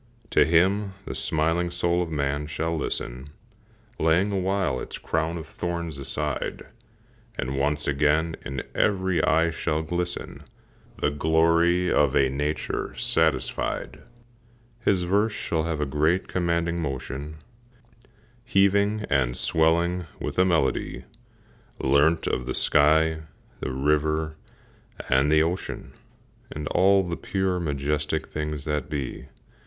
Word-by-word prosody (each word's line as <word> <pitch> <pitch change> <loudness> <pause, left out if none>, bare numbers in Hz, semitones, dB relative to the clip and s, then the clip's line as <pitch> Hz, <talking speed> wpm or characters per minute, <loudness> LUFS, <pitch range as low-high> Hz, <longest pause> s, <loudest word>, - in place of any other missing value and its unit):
To - - +5
him 95 +4 +2
the - - -5
smiling 80 +5 0
soul 85 0 0
of 85 - -2
man 70 -1 -1
shall 80 +2 -2
listen, 65 -3 -4 0.7
Laying 85 +6 +3
awhile 95 -7 0
its - - -6
crown 80 +1 -1
of 80 - -6
thorns 85 -2 -4
aside, 75 +1 -3 0.7
And 65 +1 -2
once 75 +2 0
again 75 +3 +2
in 70 -1 -4
every 95 -4 +1
eye 80 +1 +3
shall 80 -1 -1
glisten 90 +2 -4 0.6
The 75 - 0
glory 85 +4 +3
of 75 -3 +3
a 65 -1 +4
nature 75 +3 -2
satisfied. 80 -5 0 0.8
His 95 -6 +1
verse 100 +5 +2
shall 80 -5 -1
have 80 -2 -2
a 75 - 0
great, 75 +6 +1
commanding 85 -1 0
motion, 70 +1 -5 1.1
Heaving 100 -1 +2
and 65 -3 +1
swelling 85 +2 +2
with - - -3
a 90 - +6
melody 80 -7 0 0.8
Learnt 70 +5 +3
of 60 - -2
the - - -2
sky, 80 +2 +3 0.4
the - - -3
river, 75 +3 0 0.7
and 65 +3 +3
the 80 0 +5
ocean, 85 +3 -4 0.6
And 75 0 -5
all 95 +1 +4
the 85 -2 -4
pure, 95 -2 -1
majestic 75 0 -1
things 75 -2 -4
that 75 -1 -2
be. 70 -4 -4
80 Hz, 125 wpm, -25 LUFS, 75-85 Hz, 1.1 s, a